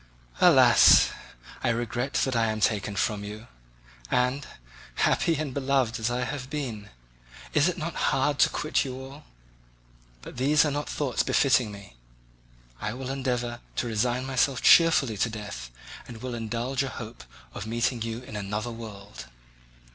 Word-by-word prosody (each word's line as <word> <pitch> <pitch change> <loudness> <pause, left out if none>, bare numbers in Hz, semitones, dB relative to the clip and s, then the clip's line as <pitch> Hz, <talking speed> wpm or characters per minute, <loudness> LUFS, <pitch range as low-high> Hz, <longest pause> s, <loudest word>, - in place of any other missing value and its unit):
Alas! - - +7 0.5
I 130 - +2
regret 120 +3 -2
that 130 -2 -2
I 115 -1 +2
am 110 0 -2
taken 105 -1 0
from 105 0 -1
you; 105 +2 -8 0.6
and, 125 +3 0 0.5
happy 165 - +2
and 145 -3 -3
beloved 130 -3 0
as 110 +1 0
I 125 +1 -1
have 130 0 -5
been, 125 -9 -5 0.6
is 150 +2 +4
it 180 0 -1
not 170 0 -4 0.2
hard 140 +1 0
to - - +5
quit 155 - 0
you 130 -2 -6
all? 135 +3 -11 1.0
But - - -10
these 145 +5 +4
are 150 - 0
not 145 +1 -3
thoughts 140 -4 -1
befitting 130 -6 +2
me; 100 -11 -12 0.8
I 105 - -3
will 130 0 -5
endeavour 125 -3 -2 0.2
to - - -1
resign 120 +3 0
myself 135 0 0
cheerfully 155 -9 +5
to 105 - +1
death 105 - -7 0.4
and 120 - -9
will 125 +1 -5
indulge 120 +3 -2
a 135 - -2
hope 115 - -9 0.3
of 105 - -6
meeting 120 +1 -1
you 115 +2 -4
in 110 - -10
another 105 +3 -3
world." 105 -3 -10
120 Hz, 155 wpm, -27 LUFS, 110-135 Hz, 1.0 s, Alas